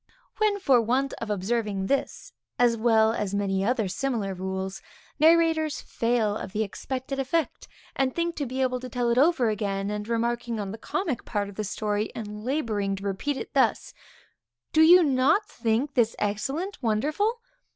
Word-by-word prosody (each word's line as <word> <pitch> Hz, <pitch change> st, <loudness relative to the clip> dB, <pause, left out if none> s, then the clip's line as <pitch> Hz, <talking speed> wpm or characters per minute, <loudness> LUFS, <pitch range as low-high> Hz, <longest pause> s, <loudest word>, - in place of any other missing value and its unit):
When, 425 Hz, -2 st, +2 dB
for 270 Hz, -10 st, +4 dB
want 255 Hz, +4 st, 0 dB
of 230 Hz, -, -4 dB
observing 205 Hz, 0 st, -1 dB
this, 275 Hz, +7 st, -2 dB, 0.2 s
as 240 Hz, -1 st, +4 dB
well 220 Hz, -1 st, +3 dB
as 205 Hz, -3 st, -2 dB
many 195 Hz, -1 st, 0 dB
other 225 Hz, -1 st, +1 dB
similar 210 Hz, -1 st, -2 dB
rules, 190 Hz, +1 st, -4 dB, 0.4 s
narrators 320 Hz, -1 st, +4 dB
fail 230 Hz, -3 st, 0 dB
of 200 Hz, -, -6 dB
the 220 Hz, 0 st, +1 dB
expected 260 Hz, +6 st, -5 dB
effect, 310 Hz, +5 st, -1 dB, 0.3 s
and 265 Hz, -2 st, 0 dB
think 340 Hz, 0 st, -1 dB
to 285 Hz, -, -2 dB
be 260 Hz, +2 st, -1 dB
able 255 Hz, -1 st, 0 dB
to 255 Hz, 0 st, -7 dB
tell 245 Hz, -1 st, 0 dB
it 240 Hz, -, +3 dB
over 285 Hz, -6 st, +3 dB
again, 200 Hz, -2 st, -2 dB
and 210 Hz, 0 st, -4 dB
remarking 235 Hz, 0 st, -1 dB
on 200 Hz, -2 st, -4 dB
the 220 Hz, -, -8 dB
comic 320 Hz, -, -2 dB
part 205 Hz, -2 st, -2 dB
of 200 Hz, -, -12 dB
the 215 Hz, -, -3 dB
story, 210 Hz, +1 st, -2 dB
and 210 Hz, -1 st, -6 dB
laboring 220 Hz, -7 st, -1 dB
to 195 Hz, -, -9 dB
repeat 205 Hz, +9 st, -2 dB
it -, -, -7 dB
thus; -, -, +1 dB, 0.8 s
_Do 315 Hz, -, +6 dB
you 355 Hz, +1 st, +8 dB
not 290 Hz, +8 st, +3 dB
think 240 Hz, +5 st, -1 dB
this 235 Hz, -4 st, +2 dB
excellent, 270 Hz, -, -2 dB
wonderful? 300 Hz, -, 0 dB
235 Hz, 170 wpm, -26 LUFS, 210-275 Hz, 0.8 s, you